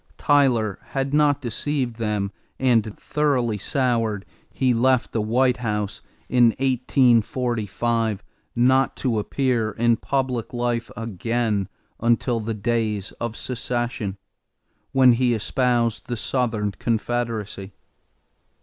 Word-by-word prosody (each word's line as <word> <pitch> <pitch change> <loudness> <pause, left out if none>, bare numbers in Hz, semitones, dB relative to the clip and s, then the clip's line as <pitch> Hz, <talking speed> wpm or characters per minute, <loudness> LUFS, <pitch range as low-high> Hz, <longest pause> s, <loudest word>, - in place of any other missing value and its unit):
Tyler 125 -9 +2
had 135 0 -3
not 145 -1 +3
deceived 125 0 -2
them 105 -3 -1 0.3
and, 115 -5 +1
thoroughly 130 -7 0
soured, 115 -5 0 0.2
he 130 -2 +1
left 130 +1 +2
the 110 - 0
White 125 +4 +2
House 105 -3 -3 0.3
in 125 -1 +4
1845 120 -4 +1 0.3
not 130 +3 +3
to 120 -5 0
appear 120 0 0
in 115 +2 +2
public 130 -3 -2
life 120 -1 -1
again 115 -1 -1 0.3
until 120 +1 +1
the 110 0 -3
days 105 -2 -1
of 115 -1 -3
secession, 120 -4 -3 0.7
when 130 -2 +6
he 120 0 +2
espoused 120 0 0
the 120 - -3
Southern 110 -3 -1
confederacy. 110 -3 -2
120 Hz, 105 wpm, -23 LUFS, 110-125 Hz, 0.7 s, when